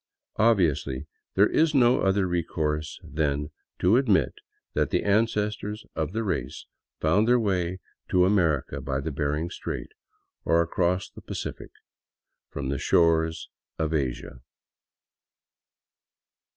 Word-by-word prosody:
Obviously 75 - +2 0.3
there 100 - +6
is 155 +6 +2
no 125 -2 +5
other 95 0 +2
re 90 -1 0
course 75 -2 -3
then 75 0 -1 0.3
to 95 +6 +4
admit 115 -8 +2 0.4
that - - +1
the - - 0
ancestors 105 0 0
of 80 0 -2
the 115 +3 -2
race 95 -6 -3 0.3
found 100 +8 +3
their 125 0 +5
way 95 -4 0 0.3
to 90 -1 +4
America 85 -8 +1
by 65 0 -2
the 80 +3 -3
Behring 75 +4 -2
Strait, - - -5 0.5
or 85 - +3
across 90 +2 +1
the - - -14
Pacific - - -6 0.8
from 70 -2 -4
the 70 -1 -2
shores 80 -1 +2 0.3
of 80 0 -1
Asia. 65 -3 -3
85 Hz, 125 wpm, -26 LUFS, 75-105 Hz, 0.8 s, there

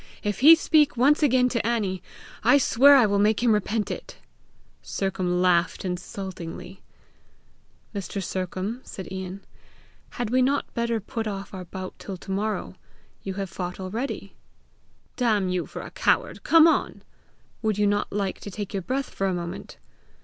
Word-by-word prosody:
"If 205 -1 -2
he 310 +6 +9
speak 305 -4 +3
once 285 +6 +4
again 255 -3 +4
to 235 -3 -1
Annie, 205 -5 -1 0.4
I 285 - +6
swear 280 +1 +6
I 255 -4 +6
will 200 -1 +1
make 215 +2 +2
him 240 - +4
repent 210 +1 -1
it!" - - -7 0.6
Sercombe 190 -2 -2
laughed 180 0 +2
insultingly. 180 0 -6 1.1
"Mr. 200 -1 -4
Sercombe," 185 +6 -3
said 190 - -8
Ian, 190 +1 -6 0.7
"had 240 -2 -2
we 255 +1 +3
not 275 +3 0
better 235 -1 0
put 220 +2 -4
off 195 -1 -5
our 185 -1 -6
bout 185 +2 -7
till 195 -2 -7
to 195 - -9
morrow? 210 +2 -2 0.5
You 190 -1 -5
have 195 -2 -4
fought 180 0 -5
already!" 215 +8 -4 0.8
"Damn 215 -7 +2
you 180 -1 -1
for - - -7
a - - -9
coward, - - +1
come 330 0 +6
on!" 325 - 0 0.6
"Would 215 -2 0
you 210 - +2
not 205 0 0
like 200 -2 -2
to - - -8
take 205 0 -6
your 195 - -1
breath 265 +8 -3
for 195 - -1
a 185 - 0
moment?" 175 +1 -6
205 Hz, 165 wpm, -25 LUFS, 185-235 Hz, 1.1 s, he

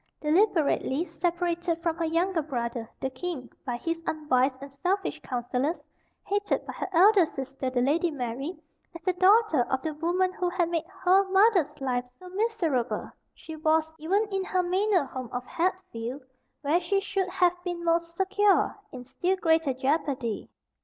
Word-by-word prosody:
Deliberately 320 -3 +2
separated 345 -1 -1
from 335 -2 +1
her 335 - 0
younger 335 +2 +1
brother, 235 -5 -4
the 265 - -2
king, 265 -2 -5
by 245 -3 -3
his 330 +5 -3
unwise 265 -4 +1
and 275 0 -10
selfish 355 +2 -1
counsellors, 250 +5 -1 0.5
hated 410 +1 0
by - - -6
her - - -4
elder 385 +2 +6
sister, 270 -3 -4
the 250 -1 +1
Lady 325 +6 +2
Mary, 270 +3 -4 0.4
as 335 - -9
the 370 - +1
daughter 380 - +4
of 265 - +2
the 315 - -2
woman 355 +4 0
who 360 -1 -1
had 350 -2 0
made 330 -1 -1
HER 380 0 +3
mother's 380 -7 +3
life 250 -2 -1
so 365 - -12
miserable, 360 - -1 0.2
she 320 - -9
was, 315 0 +1
even 390 +8 +1
in 385 -1 0
her 370 -1 0
manor 370 -2 +2
home 260 -3 -6
of 245 0 -4
Hatfield, 290 -8 -3 0.4
where 310 +5 +2
she 390 +3 +1
should 390 -1 -2
have 360 -1 +3
been 350 -1 -4
most 335 0 +1
secure, 400 +2 +3 0.2
in 250 -1 -8
still 355 +9 -1
greater 325 -5 +2
jeopardy. 265 -4 -1
330 Hz, 160 wpm, -27 LUFS, 275-370 Hz, 0.5 s, elder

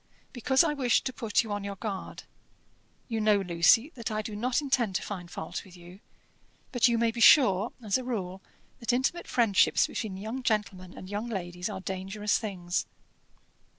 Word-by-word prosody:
"Because 265 +4 +3
I 310 -3 0
wished 255 -5 +1
to 255 - -2
put 225 -1 0
you 220 - -7
on 205 -1 -3
your 200 0 -5
guard. 195 -1 -6 0.8
You 225 -2 -2
know, 210 -1 +4
Lucy, 195 - +3
that 235 -3 -5
I 215 0 -2
do 210 0 -6
not 245 +4 0
intend 255 -9 0
to - - -1
find 180 -4 -6
fault 160 - -6
with 185 -2 -15
you; 175 +2 -14 0.7
but 245 -1 +4
you 235 -1 +2
may 230 0 +2
be 235 +1 -5
sure, 220 -5 +6
as 210 +3 +1
a - - -6
rule, 190 -7 -4 0.4
that 235 -1 -1
intimate 265 +8 -1
friendships 225 -6 +3
between 205 -5 -5
young 220 +6 -5
gentlemen 200 -6 -2
and 185 - -9
young 205 +4 -4
ladies 180 -4 -4
are - - -6
dangerous 195 +2 -2
things." 180 -5 -3
215 Hz, 185 wpm, -28 LUFS, 190-240 Hz, 0.8 s, sure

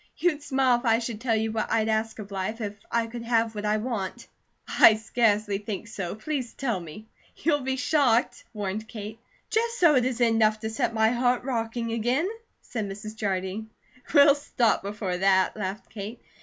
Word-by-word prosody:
You'd 330 -4 +1
smile 265 -3 +2
if 240 - -10
I 225 -1 +4
should 230 -2 -5
tell 235 -2 +1
you 220 0 0
what 220 0 -2
I'd 220 -1 +2
ask 220 0 0
of 210 -2 -8
life, 195 +4 -3
if 205 -3 -3 0.2
I 230 -1 +1
could 235 +1 -7
have 230 -1 +1
what 210 0 -5
I 210 +1 +2
want." 220 -1 -4 0.4
"I 220 - +7
scarcely 215 -2 +1
think 210 +1 -5
so. 195 -5 -5
Please 255 +2 -4
tell 235 -8 -1
me." 170 +5 -10 0.3
"You'll 295 -2 +1
be 265 0 -1
shocked," 255 -2 +2
warned 210 0 -4
Kate. 220 0 -8 0.3
"Just 465 +1 0
so 340 -4 +6
it 255 -3 +4
isn't 245 -1 +2
enough 220 -1 +3
to 220 -1 -3
set 225 +1 -1
my 220 0 +4
heart 245 +1 +1
rocking 230 -2 -2
again," 245 +9 +1 0.4
said 215 -4 -4
Mrs. 215 +2 -7
Jardine. 200 +1 -3 0.4
"We'll 285 -2 +7
stop 275 -5 +1
before 200 -2 -3
that," 190 0 +3
laughed 200 -1 -5
Kate. 215 +3 -7
225 Hz, 185 wpm, -26 LUFS, 210-245 Hz, 0.4 s, I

